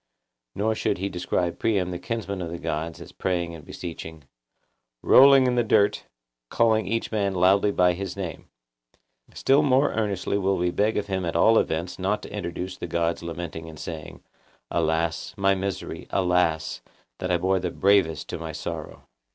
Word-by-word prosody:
Nor 110 +2 +1
should - - -1
he 95 +2 -2
describe 90 -1 -2
Priam 95 -5 +1
the 90 - -4
kinsman 100 -3 -4
of 85 - -4
the 85 - -5
gods 80 0 -4
as - - -11
praying 85 -2 -2
and 80 -2 -10
beseeching, 80 -2 -8 0.8
'Rolling 135 0 +7
in 125 - +2
the 120 -1 +2
dirt, 105 -2 +2 0.4
calling 110 -2 +2
each 115 0 -2
man 100 -3 0
loudly 95 +3 +4
by 90 -3 +3
his 95 +2 -5
name.' 90 -5 -6 0.9
Still 140 +2 +4
more 140 -1 +3
earnestly 100 -2 -1
will 95 0 +1
we 90 0 0
beg 105 +4 +1
of 105 - -1
him 95 -2 -2
at 85 -1 -3
all 110 +6 +5
events 85 +4 -2
not 100 +3 -1
to - - -9
introduce 90 -1 -5
the - - -5
gods 85 0 -1
lamenting 85 -1 -6
and 80 - -11
saying, 80 -1 -8 0.5
'Alas! 80 +1 -1
my 100 0 +3
misery! 95 0 -4
Alas! 90 -4 +1 0.4
that 90 - -3
I 90 - +3
bore 95 +2 +1
the 90 0 -2
bravest 95 -4 +2
to - - -4
my 80 -1 -6
sorrow. 80 +1 -6
90 Hz, 175 wpm, -25 LUFS, 85-100 Hz, 0.9 s, Rolling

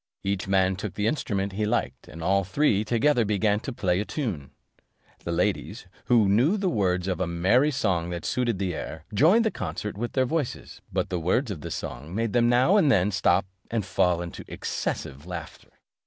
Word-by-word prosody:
Each 100 -1 -2
man 95 -1 +2
took 105 -2 -5
the 105 - -1
instrument 100 -8 -1
he 105 +2 -2
liked, 120 +2 -2
and 80 +4 -9
all 95 +2 +2
three 105 +1 +2
together 120 +4 +2
began 105 0 +1
to 135 - -5
play 95 -7 0
a - - 0
tune 105 - -4 0.8
The 85 - -2
ladies, 90 +4 -1 0.2
who 115 -4 +4
knew 125 - +3
the 190 -3 0
words 90 - 0
of 90 -2 -1
a 90 - 0
merry 95 - +3
song 95 - 0
that 85 -1 -5
suited 120 -5 0
the 95 -2 -2
air, 80 0 -6
joined 180 - +5
the 220 - +2
concert 95 +4 -5
with 120 +1 -3
their 130 -1 +2
voices; 150 -1 -3
but - - -1
the 90 - 0
words 105 - +1
of 85 -7 -6
the - - -6
song 70 +9 -6
made 115 -1 -1
them 120 -1 +4
now 130 +12 +4
and 155 -9 +4
then 100 -3 +3
stop, 90 0 +2 0.2
and 115 -4 -1
fall 90 -2 +1
into 85 - -8
excessive 70 +5 -4
laughter. 85 -3 -8
100 Hz, 200 wpm, -26 LUFS, 90-120 Hz, 0.8 s, joined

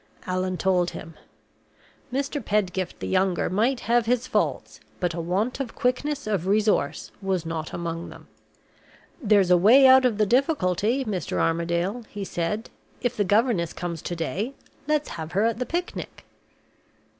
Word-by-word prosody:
Allan 185 0 -1
told 180 -2 +2
him. 165 +1 -9 1.0
Mr. 275 +1 -2
Pedgift 190 -3 -1
the - - -3
younger 185 -2 +1
might 235 +6 +1
have 235 -1 +2
his 250 +1 +1
faults, - - -1 0.2
but 175 -2 0
a 170 - -4
want 195 +10 -1
of 260 -4 -4
quickness 280 +4 -1
of 200 -5 -1
resource 210 +1 +1
was 190 -3 -1
not 160 -1 -4
among 170 0 -4
them. - - -13 0.9
"There's 200 -6 +4
a 180 - +7
way 235 +10 +7
out 260 0 +8
of 240 -5 +2
the 215 - +3
difficulty, 245 - +1
Mr. 200 -5 -3
Armadale," 170 +7 0
he 205 -2 -5
said. 185 +6 -3 0.3
"If 245 - -1
the 205 - +1
governess 205 -4 +2
comes 170 -1 -5
to 175 - -4
day, 195 +10 -3 0.3
let's 300 -1 +1
have 160 0 -7
her 200 +4 +2
at 230 0 0
the 250 - -2
picnic." 350 +1 -5
205 Hz, 155 wpm, -25 LUFS, 175-245 Hz, 1.0 s, out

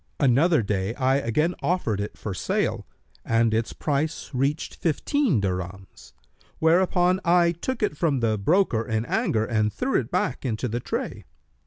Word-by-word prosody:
Another 140 +2 +4
day 100 +2 -2
I 135 0 +2
again 140 +7 0
offered 115 - 0
it 105 - -6
for 105 - -5
sale - - -1 0.4
and 115 0 +2
its 115 +1 0
price 150 +2 -2
reached 140 +4 -1
fifteen 180 - +1
dirhams; 95 0 -5 0.4
whereupon 180 +2 +3
I 170 0 +4
took 230 +8 -4
it 205 - 0
from 150 -4 +1
the 110 -3 0
broker 140 - +2
in 110 0 -2
anger 110 -2 0
and 110 -2 0
threw 260 - 0
it 115 - -5
back 130 - -1
into 125 -1 -2
the 120 +1 -2
tray. - - -4
130 Hz, 155 wpm, -25 LUFS, 110-170 Hz, 0.4 s, Another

